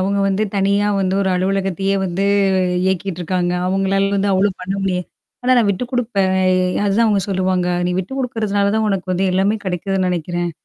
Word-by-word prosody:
அவுங்க 200 Hz, +2 st, 0 dB
வந்து 195 Hz, +2 st, 0 dB
தனியா 200 Hz, +1 st, +2 dB
வந்து 190 Hz, 0 st, 0 dB
ஒரு 190 Hz, -, +1 dB
அலுவலகத்தையே 195 Hz, +1 st, 0 dB
வந்து 190 Hz, +1 st, -1 dB, 0.6 s
இயக்கிட்டுருக்காங்க. 180 Hz, -1 st, -1 dB
அவுங்களால 195 Hz, +1 st, +1 dB
வந்து 200 Hz, 0 st, +1 dB
அவ்ளோ 195 Hz, +2 st, +3 dB
பண்ண 185 Hz, +1 st, -3 dB
முடியாது. 180 Hz, -2 st, -1 dB, 0.4 s
ஆனா 255 Hz, +1 st, +3 dB
நான் 225 Hz, -4 st, +3 dB
விட்டு 200 Hz, +5 st, -1 dB
குடுப்பேன் 220 Hz, -7 st, 0 dB, 0.5 s
அதுதான் 210 Hz, +3 st, +2 dB
அவுங்க 205 Hz, -2 st, +2 dB
சொல்லுவாங்க, 185 Hz, -1 st, 0 dB, 0.2 s
"நீ 180 Hz, -, 0 dB
விட்டு 190 Hz, +7 st, -4 dB
குடுக்கிறதுனால 210 Hz, -5 st, 0 dB
தான் 220 Hz, 0 st, +1 dB
உனக்கு 195 Hz, -3 st, -2 dB
வந்து 190 Hz, +2 st, 0 dB
எல்லாமே 195 Hz, +4 st, +2 dB
கிடைக்குதுன்னு 185 Hz, 0 st, -1 dB
நினைக்கிறேன். 175 Hz, 0 st, -2 dB
195 Hz, 165 wpm, -19 LUFS, 185-200 Hz, 0.6 s, அவ்ளோ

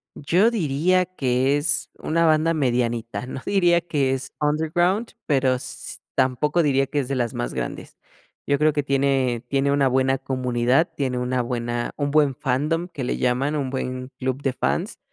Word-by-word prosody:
Yo 185 Hz, +10 st, +2 dB
diría 180 Hz, -, +1 dB
que 135 Hz, -4 st, +1 dB
es 145 Hz, 0 st, 0 dB
una 165 Hz, +1 st, +1 dB
banda 160 Hz, +1 st, +3 dB
medianita, 120 Hz, -5 st, -1 dB
no 130 Hz, +1 st, -6 dB
diría 175 Hz, -4 st, +3 dB
que 145 Hz, -6 st, 0 dB
es 135 Hz, 0 st, -5 dB
underground, 170 Hz, +8 st, +1 dB
pero, 135 Hz, -3 st, +2 dB
s 125 Hz, -, -8 dB, 0.2 s
tampoco 135 Hz, +6 st, +1 dB
diría 135 Hz, -3 st, +2 dB
que 145 Hz, +2 st, -2 dB
es 130 Hz, -, -2 dB
de 135 Hz, -, -2 dB
las 120 Hz, -3 st, -1 dB
más -, -, -4 dB
grandes. -, -, -5 dB, 0.5 s
Yo 140 Hz, -1 st, +1 dB
creo 155 Hz, 0 st, +3 dB
que 145 Hz, -, 0 dB
tiene 135 Hz, -3 st, +1 dB
tiene 140 Hz, 0 st, +1 dB
una 140 Hz, -1 st, +3 dB
buena 130 Hz, +1 st, +2 dB
comunidad, 130 Hz, +3 st, +1 dB
tiene 130 Hz, -3 st, -1 dB
una 125 Hz, 0 st, 0 dB
buena 120 Hz, 0 st, -3 dB
un 145 Hz, -1 st, -1 dB
buen 145 Hz, -3 st, +3 dB
fandom 150 Hz, +7 st, -1 dB
que 150 Hz, -6 st, -6 dB
le 125 Hz, -, -1 dB
llaman, 130 Hz, +4 st, 0 dB
un 135 Hz, -3 st, -2 dB
buen 130 Hz, -1 st, -4 dB
club 130 Hz, +1 st, -2 dB
de 135 Hz, -, 0 dB
fans, 180 Hz, -, -2 dB
135 Hz, 175 wpm, -23 LUFS, 130-155 Hz, 0.5 s, banda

